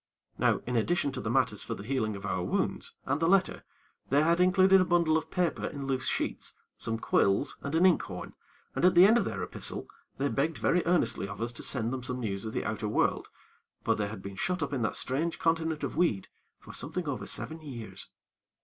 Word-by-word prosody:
Now, - - +3
in 125 - -2
addition 140 +5 +1
to 130 -1 -5
the 110 - -3
matters 125 -4 +1
for - - -3
the 100 - -8
healing 110 -3 -1
of 100 0 -7
our 95 -2 -1
wounds, - - -2
and 145 - 0
the 165 - +3
letter, 190 +1 +2 0.5
they 145 +3 +4
had 170 +2 +3
included 190 +1 +6
a - - +5
bundle 170 -3 +3
of 160 - -1
paper 180 -3 0
in 140 -1 -6
loose 130 -1 -1
sheets, - - -2 0.2
some 115 0 -3
quills 100 +2 +1
and 140 +3 -3
an 170 +3 +5
inkhorn, 185 -3 +1 0.4
and - - -1
at 180 0 +5
the 175 +2 +9
end 225 +4 +6
of - - 0
their - - -3
epistle, - - -4 0.3
they 140 - +1
begged 145 +4 0
very 175 +1 +2
earnestly 140 - +2
of 105 - -8
us 115 +1 -2
to 115 - -8
send 120 -2 -1
them 130 - -3
some 125 0 -4
news 100 -3 -3
of 110 - -4
the - - -2
outer 110 0 -2
world; 105 - +1 0.5
for - - +3
they 105 - -1
had 100 -2 -8
been 100 0 -7
shut 180 - -1
up 145 0 -3
in 130 - -1
that 110 - 0
strange 155 +6 -1
continent 165 -1 0
of - - -3
weed 150 - +1 0.3
for - - -13
something 160 +4 -4
over 140 -3 -3
seven 160 +1 -4
years. 125 -7 -8
140 Hz, 220 wpm, -30 LUFS, 115-170 Hz, 0.5 s, the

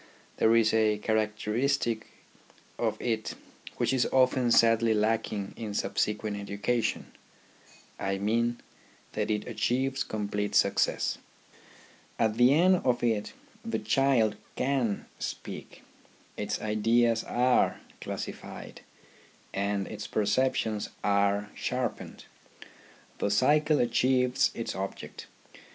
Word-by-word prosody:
There 115 +1 +4
is 110 -1 +4
a 110 -1 +3
characteristic 110 +3 0 0.7
of - - -1
it 110 -3 -2 0.4
which - - +1
is 130 -2 +2
often 130 -1 +3
sadly 115 -1 +4
lacking 105 -2 -1
in 105 -3 -5
subsequent 105 0 -1
education; 100 +4 -2 0.9
I 95 0 -1
mean, 115 +4 0 0.5
that 105 0 -2
it 105 -1 -1
achieves 135 +2 0
complete 105 -1 -3
success. - - +2 1.0
At 110 -1 +1
the 125 +2 +6
end 180 +5 +5
of 125 -7 0
it 110 -3 0 0.3
the - - -2
child 125 -6 +2 0.2
can 125 -6 0
speak, - - -7 0.5
its 105 0 -3
ideas 115 +2 +2
are 125 +1 +2 0.2
classified, - - -7 0.7
and 100 0 -1
its - - -6
perceptions 110 -1 0
are 100 0 +1
sharpened. 125 -2 -4 0.9
The - - 0
cycle 150 +8 +3
achieves 125 +1 +2
its 115 - -3
object. 95 0 -6
115 Hz, 105 wpm, -29 LUFS, 105-125 Hz, 1.0 s, the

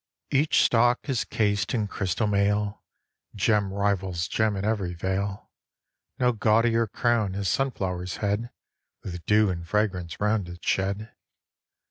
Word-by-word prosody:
Each 145 +3 +3
stalk 120 +3 +3
is 130 -3 0
cased 105 +1 0
in 110 -3 0
crystal 100 +2 -1
mail, 105 0 +1 0.5
Gem 105 -1 +2
rivals 95 -3 -1
gem 110 -2 +1
in 95 +1 -3
every 100 -5 -1
vale; 95 +3 -3 0.7
No 125 -1 +3
gaudier 115 +1 +2
crown 110 -3 0
has 100 -1 -2
sunflower's 90 -9 -1
head, 105 +3 -1 0.5
With 90 -2 -6
dew 105 -1 +4
and 85 -1 -4
fragrance 95 -5 -1
round 105 -3 0
it 90 0 -10
shed. 100 +3 -1
105 Hz, 130 wpm, -26 LUFS, 95-110 Hz, 0.7 s, dew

